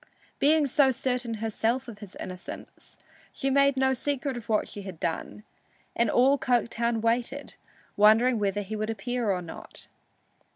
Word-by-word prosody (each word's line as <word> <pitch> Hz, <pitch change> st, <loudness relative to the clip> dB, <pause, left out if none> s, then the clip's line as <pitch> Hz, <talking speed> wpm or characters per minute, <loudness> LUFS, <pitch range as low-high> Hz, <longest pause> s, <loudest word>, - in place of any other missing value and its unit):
Being 305 Hz, +1 st, +4 dB
so 275 Hz, 0 st, +4 dB
certain 250 Hz, -2 st, -1 dB
herself 225 Hz, +4 st, -1 dB
of 220 Hz, -3 st, -9 dB
his 205 Hz, -3 st, -10 dB
innocence, 185 Hz, -1 st, -9 dB, 0.3 s
she 270 Hz, -1 st, -2 dB
made 280 Hz, 0 st, +4 dB
no 265 Hz, 0 st, +3 dB
secret 275 Hz, +1 st, -2 dB
of 235 Hz, -2 st, -8 dB
what 215 Hz, -1 st, +2 dB
she 205 Hz, -, -7 dB
had 190 Hz, -4 st, -8 dB
done, 170 Hz, +5 st, -3 dB, 0.5 s
and 235 Hz, -1 st, +2 dB
all 270 Hz, +5 st, +4 dB
Coketown 235 Hz, -2 st, +1 dB
waited, 240 Hz, +5 st, -1 dB, 0.4 s
wondering 220 Hz, +3 st, +5 dB
whether 205 Hz, 0 st, 0 dB
he 210 Hz, +3 st, -5 dB
would 215 Hz, +1 st, -2 dB
appear 230 Hz, +2 st, -2 dB
or 180 Hz, -2 st, 0 dB
not. 165 Hz, -, -8 dB
235 Hz, 155 wpm, -27 LUFS, 210-265 Hz, 0.5 s, wondering